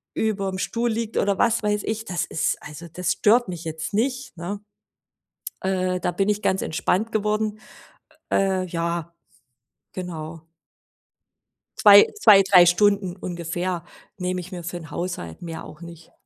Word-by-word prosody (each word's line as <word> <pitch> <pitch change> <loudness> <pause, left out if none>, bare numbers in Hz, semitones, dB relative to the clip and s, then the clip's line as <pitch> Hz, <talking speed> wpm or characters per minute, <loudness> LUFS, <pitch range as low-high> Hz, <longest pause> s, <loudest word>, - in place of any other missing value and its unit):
überm 195 -3 -1
Stuhl 235 +4 -1
liegt 225 0 -3
oder, 200 -1 +1
was 235 0 +3
weiß 210 0 0
ich, 220 0 -3
das 175 -3 -2
ist 160 - -1
also 150 +3 -9
das 180 +1 -1
stört 230 +1 +3
mich 170 -2 -6
jetzt 160 +2 -5
nicht, 255 +1 -1
ne, 195 +5 -5 1.0
äh, 185 -1 0
da - - 0
bin 195 +2 0
ich 210 0 -1
ganz 190 - +1
entspannt 195 +7 -1
geworden. 215 0 -1 0.7
Äh, 190 -1 +1
ja, 170 -1 -3 0.8
genau. 165 -3 -6 1.3
2- 205 -2 +9
2, 205 - +8
3 185 -2 +6
Stunden 195 0 +2
ungefähr 175 -1 -4 0.3
nehme 180 0 -2
ich 180 +2 -10
mir 175 -1 -6
für 175 +1 -5
'n 165 -1 -12
Haushalt, 150 - -5
mehr 165 -2 -6
auch 155 +1 -12
nicht. 170 -1 -12
185 Hz, 150 wpm, -23 LUFS, 170-210 Hz, 1.3 s, 2